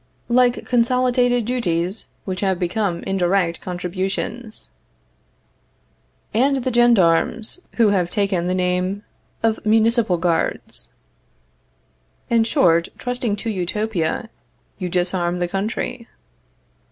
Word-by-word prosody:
Like 245 0 +3
consolidated 245 0 +2
duties, 195 -5 -1 0.2
which 185 -1 -3
have 190 -2 +1
become 180 0 -1
indirect 180 -2 0
contributions. 190 +6 -4 1.6
And 265 +3 +2
the 255 - -1
gendarmes, 230 - +3
who 230 -3 +4
have 185 -4 +1
taken 190 -3 0
the 185 - 0
name 180 +2 0 0.4
of 225 -1 +1
municipal 220 -2 +3
guards. 170 -1 -1 1.4
In 230 -1 +4
short, 170 - +3
trusting 245 -4 -2
to 225 +2 -4
Utopia, 200 +1 -2 0.5
you 180 -2 -3
disarm 175 0 0
the 175 0 -1
country. 215 +5 -3
200 Hz, 100 wpm, -21 LUFS, 180-235 Hz, 1.6 s, who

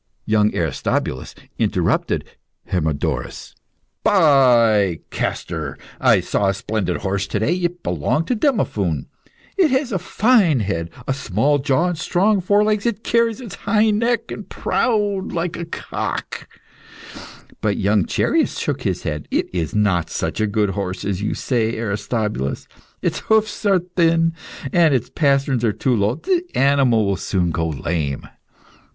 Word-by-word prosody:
Young 105 0 +3
Aristobulus 75 -5 -2 0.2
interrupted - - 0 0.5
Hermodorus. 80 -5 -2 0.5
"By 120 - +4
Castor! 80 -5 -3 0.2
I - - +4
saw 100 - 0
a 95 - +1
splendid 100 -3 -2
horse 100 0 -1
to - - -2
day. 125 +10 +1
It 175 -1 -3
belonged 90 - 0
to 250 - +2
Demophoon. 105 - 0 0.5
It 365 -5 +4
has 260 -1 0
a 190 - 0
fine 190 - +3
head, 85 -5 -2 0.2
small 140 +3 +1
jaw, 140 +5 +1
and 175 - -3
strong 195 +3 +2
forelegs. 205 +3 +2
It 225 -2 -2
carries 230 0 +1
its 240 -6 -8
neck - - -20
high 220 +2 +2
and - - -9
proud, 205 -5 0
like 170 0 -2
a 170 - -5
cock." 165 - -5 1.1
But - - 0
young 100 -2 +2
Chereas - - +1
shook - - -2
his - - -2
head. 75 -1 -4
"It - - -1
is 85 -2 -2
not 95 -6 +1
such - - -2
a 110 - +2
good 105 -1 +1
horse 95 -1 -4
as 100 -1 -2
you 105 - -1
say, 115 -3 -1
Aristobulus. 105 - -2 0.4
Its - - 0
hoofs 215 -1 +1
are 195 -2 +5
thin, 165 -2 +1 0.4
and 165 -5 +4
the 125 - -2
pasterns 140 -4 +1
are 115 - +3
too 125 +3 0
low; 105 +2 +1
the 345 - 0
animal 135 -5 +3
will 100 -1 0
soon 90 -3 -1
go 80 +1 -1
lame." 75 -2 -3
125 Hz, 145 wpm, -20 LUFS, -, 1.1 s, are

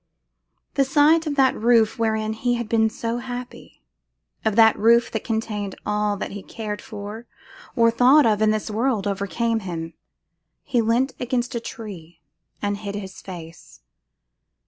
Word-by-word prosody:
The 275 - +3
sight 300 +4 +4
of 290 - -1
that 265 -2 +4
roof 230 -1 +3
wherein 220 -1 0
he 245 +2 0
had 235 -2 -3
been 220 0 +2
so 230 +1 -3
happy; 245 0 -8 0.6
of 220 -2 +1
that 225 -1 +6
roof 235 +2 +4
that 220 - -3
contained 215 -3 -3
all 210 0 0
that - - -5
he 205 - -6
cared 210 0 -6
for 215 +2 -8 0.5
or 230 -2 +4
thought 255 +6 +5
of 215 -2 +2
in 215 - +4
this 215 0 -1
world, 225 -1 0
overcame 205 +3 -1
him. 165 -4 -6 0.7
He 240 - +1
leant 240 +4 +1
against 245 0 -1
a 235 - -1
tree, 180 -8 -9 0.4
and 205 0 0
hid 200 -1 -6
his 190 -2 -7
face. 165 - -11
220 Hz, 155 wpm, -23 LUFS, 205-240 Hz, 0.7 s, that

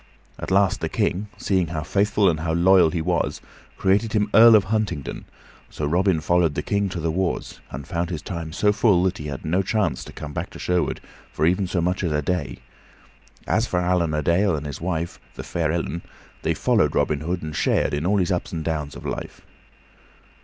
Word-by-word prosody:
At - - -5
last 95 0 +2
the - - -1
King, 100 +4 -1
seeing 95 -4 +1
how 80 -1 -4
faithful 100 +3 +2
and 80 -4 +2
how 80 0 -1
loyal 90 0 +5
he 85 -1 -2
was, - - 0 0.4
created 105 +3 +1
him 105 -2 +1
Earl 115 0 +9
of 105 - +5
Huntingdon; 100 -8 -2 0.4
so 75 - -4
Robin 90 +3 +2
followed 85 -2 +2
the - - -2
King 100 -1 0
to 90 - -5
the 80 0 -1
wars, 90 +2 -2
and 70 +2 -7
found 85 0 -2
his 80 -4 -5
time 85 -3 -5
so 105 +6 +2
full 100 -5 +3
that 95 +1 0
he 75 - -5
had 70 -2 -6
no 90 +5 +1
chance 105 +1 -1
to - - -10
come 75 -1 -8
back - - -4
to - - -11
Sherwood 90 -1 -1 0.3
for - - 0
even 90 +3 +2
so 90 -1 -1
much 90 +3 -1
as 85 -4 0
a 75 0 0
day. 85 -2 -2 0.9
As 115 +2 +1
for 90 - 0
Allan 90 -3 +1
a 75 - -1
Dale 90 +4 +2
and 75 0 -5
his 70 0 -6
wife, 85 -1 -3 0.2
the - - -6
fair 80 -3 -1
Ellen, 85 0 -2 0.4
they - - 0
followed - - +2
Robin 75 - +1
Hood 85 +3 -3
and 75 -1 -5
shared - - +1
in 75 +1 -1
all 100 +4 +2
his 95 0 +1
ups 90 - -2
and 80 -2 -4
downs 75 -3 -3
of - - -10
life. - - -5
85 Hz, 215 wpm, -23 LUFS, 80-95 Hz, 0.9 s, Earl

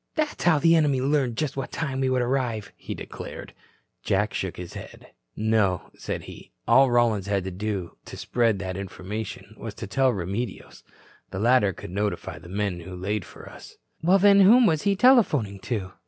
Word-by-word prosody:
"That's 305 - -2
how 170 -3 +5
the 165 +3 +4
enemy 145 -5 +3
learned 135 -3 0
just 150 -3 -2
what 135 - -4
time 140 -5 -3
we 130 -1 +1
would 130 -1 +1
arrive," 120 -5 -2
he - - -7
declared. - - -8 0.5
Jack 105 +3 0
shook 95 -2 -3
his 90 -1 -8
head. - - -11 0.2
"No," 110 -4 +1
said - - -5
he. - - -12 0.2
"All 135 0 +6
Rollins 115 -5 +2
had 100 -2 0
to 95 - -5
do 95 -2 -4
to - - -9
spread 115 -4 +1
that 95 -1 -5
information 100 +2 -6
was - - -7
to - - -6
tell 135 -1 +2
Remedios. 100 +2 -5 0.5
The - - -6
latter 115 -1 +3
could 85 - -10
notify 105 +2 -3
the 85 - -13
men 100 -2 -2
who 90 +2 -9
laid 100 +1 -3
for - - -13
us." - - -13 0.2
"Well, 180 +4 +4
then, 200 +1 +6
whom 230 +6 +7
was 160 -6 +2
he 200 -1 +1
telephoning 170 - +4
to?" 95 -4 -4
110 Hz, 185 wpm, -25 LUFS, 95-140 Hz, 0.5 s, whom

